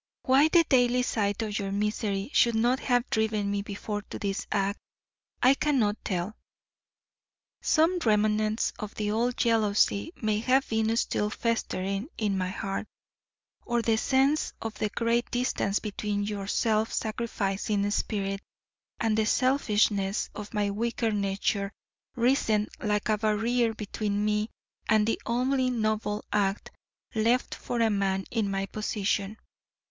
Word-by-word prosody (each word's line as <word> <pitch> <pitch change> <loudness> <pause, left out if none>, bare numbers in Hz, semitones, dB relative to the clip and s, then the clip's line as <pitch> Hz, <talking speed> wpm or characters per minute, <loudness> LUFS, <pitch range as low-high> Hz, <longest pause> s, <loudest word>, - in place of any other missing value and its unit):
Why 270 +3 +5
the 335 +1 +5
daily 250 -4 +3
sight 205 -2 0
of 215 -1 -2
your 195 -1 -3
misery 205 +1 -1
should 235 -1 +4
not 240 +4 +2
have 245 -1 +1
driven 215 -2 0
me 200 0 0
before 205 +1 -4
to - - -5
this 195 -1 -3
act, 200 0 0 0.6
I 255 +2 +7
cannot 260 -8 +1
tell. 185 +3 -2 1.3
Some 335 +3 +3
remnants 215 -2 +1
of 210 -1 -6
the 210 -1 -1
old 240 +3 0
jealousy 215 +2 +2
may 215 -2 0
have 260 +4 +2
been 220 0 +1
still 210 -2 0
festering 205 -2 -2
in 210 -3 0
my 185 -1 -1
heart; 195 +2 -4 0.8
or 240 -1 0
the 225 -1 +3
sense 270 +6 +2
of 225 -1 -4
the 210 0 -2
great 235 +2 0
distance 245 -5 0
between 205 -1 -2
your 205 -1 -4
self 220 +1 +1
sacrificing 205 -2 -1
spirit 195 -2 -1 0.6
and 225 -2 +1
the 220 0 +2
selfishness 210 -7 +1
of 210 0 -7
my 205 -2 0
weaker 230 +2 -1
nature 200 0 -1 0.4
risen 235 -4 +2
like 210 0 0
a 215 -1 +1
barrier 225 +2 +1
between 210 -1 -2
me 210 +1 0 0.4
and 215 -1 +4
the 225 - -1
only 255 +2 +1
noble 215 -3 -1
act 200 -1 0 0.4
left 230 +3 +1
for 240 -1 -3
a 225 -1 +3
man 195 -1 0
in 220 -4 0
my 195 0 -1
position. 205 0 -2
215 Hz, 140 wpm, -28 LUFS, 205-235 Hz, 1.3 s, I